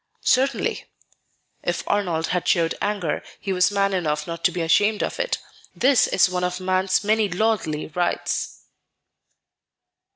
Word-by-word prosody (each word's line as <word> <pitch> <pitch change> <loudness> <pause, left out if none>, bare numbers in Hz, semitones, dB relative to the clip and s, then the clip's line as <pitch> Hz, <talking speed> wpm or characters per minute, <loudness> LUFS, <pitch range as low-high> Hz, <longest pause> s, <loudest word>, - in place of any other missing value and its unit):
"Certainly." 270 +2 +1 0.8
If - - -2
Arnold 175 -6 0
had 180 -1 -1
showed 170 -4 +2
anger, 200 -7 -1 0.2
he 195 - -3
was 180 -1 +3
man 200 -1 +1
enough 150 -5 -1
not 170 0 -6
to - - +5
be 180 - -3
ashamed 205 +6 +2
of - - -4
it; - - 0 0.4
this 265 0 +4
is 190 - +4
one 180 0 -2
of 180 0 -1
man's 185 +1 +1
many 215 0 +2
lordly 180 -5 0
rights. 175 +3 -2
185 Hz, 140 wpm, -23 LUFS, 170-205 Hz, 0.8 s, to